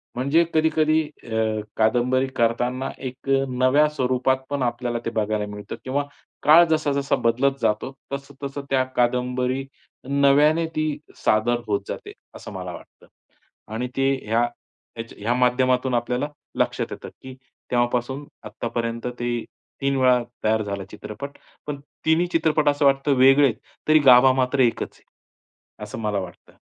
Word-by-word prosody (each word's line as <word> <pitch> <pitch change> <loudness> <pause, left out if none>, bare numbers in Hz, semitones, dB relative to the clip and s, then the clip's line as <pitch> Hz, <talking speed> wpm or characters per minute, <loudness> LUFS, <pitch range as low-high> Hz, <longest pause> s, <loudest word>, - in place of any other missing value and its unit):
म्हणजे 140 +7 +3
कधी-कधी 155 0 +3 0.2
अ, - - -12 0.5
कादंबरी 125 +4 +2
करताना 125 +3 0 0.2
एक 130 +2 -9
अ, 135 0 +3
नव्या 130 +4 +3
स्वरूपात 130 -2 +1
पण 140 -2 -1
आपल्याला 120 0 -2
ते - - 0
बघायला 105 0 -1
मिळतं. 105 0 -7
किंवा 140 +2 -1 0.4
काळ 160 +3 +8
जसा-जसा 145 -3 +1
बदलत 135 +4 +2
जातो 105 +5 0 0.2
तसं-तसं 140 0 -6
त्या 130 -1 +3
कादंबरी 125 +2 0 0.4
नव्याने 145 +4 +4
ती 155 0 0 0.3
सादर 115 +3 +1
होत 100 -1 0
जाते, - - -6 0.2
असं - - -9
मला - - -6
वाटतं. - - -14 0.7
आणि 125 +3 -2
ते 135 0 +3
ह्या 115 +2 +2 0.5
ह्याच्या 115 0 -8
ह्या 115 +3 +1
माध्यमातून 125 +1 +2
आपल्याला 125 +4 -1 0.3
लक्षात - - 0
येतं, - - -7
की 130 0 -9 0.4
तेव्हापासून 120 +3 0 0.2
आत्तापर्यंत 115 +2 -4
ते 120 -1 -2 0.4
3 140 0 +1
वेळा 125 -2 +4 0.2
तयार 110 0 +2
झाला 100 -1 -4
चित्रपट. 140 +7 -8 0.3
पण 145 -1 -4 0.3
तिन्ही 165 +3 +3
चित्रपट 155 -2 +2
असं 145 0 +1
वाटतं 135 +1 +3
वेगळे 135 +2 +6
आहे. 120 - 0 0.3
तरी 155 0 +6
गाभा 130 -1 +7
मात्र 130 +1 0
एकच 120 -3 +1
आहे, - - -24 0.8
असं 105 +2 -7
मला 105 -2 0
वाटतं. 90 -3 -10
130 Hz, 140 wpm, -23 LUFS, 120-140 Hz, 0.8 s, काळ